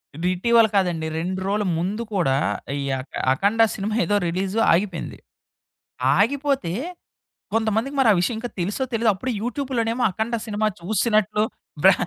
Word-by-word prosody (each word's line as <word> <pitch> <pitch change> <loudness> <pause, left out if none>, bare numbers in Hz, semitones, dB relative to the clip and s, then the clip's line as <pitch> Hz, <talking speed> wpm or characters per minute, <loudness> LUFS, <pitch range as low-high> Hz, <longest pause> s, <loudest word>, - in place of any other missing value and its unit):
ఇది 165 +4 -2
ఇటివల 230 +4 +4
కాదండి. 175 -5 +1
2 185 +3 -3
రోజుల 210 +1 0
ముందు 190 +7 -2
కూడా 170 -9 +2 0.5
ఈ - - -3 0.2
అక 130 - -9 0.2
'అఖండ' 205 +10 +3
సినిమా 210 +2 -2
ఏదో 205 - +1
రిలీజు 190 +5 -1
ఆగిపోయింది. 180 -1 -1 1.0
ఆగిపోతే, 270 - +1 0.8
కొంతమందికి 225 +4 0
మరి 265 -4 +4
ఆ - - +3
విషయం 220 +6 0
ఇంకా 240 +1 -5
తెలిసో 200 +9 -2
తెలిదో 230 -1 +3
అప్పుడే 255 +7 -3
యూట్యూబ్‌లోనేమో 245 -1 -1
'అఖండ' 220 +5 -2
సినిమా 215 0 -1
చూసినట్లు 210 +2 +1 0.4
బహే 190 0 +6
210 Hz, 140 wpm, -23 LUFS, 185-230 Hz, 1.0 s, బహే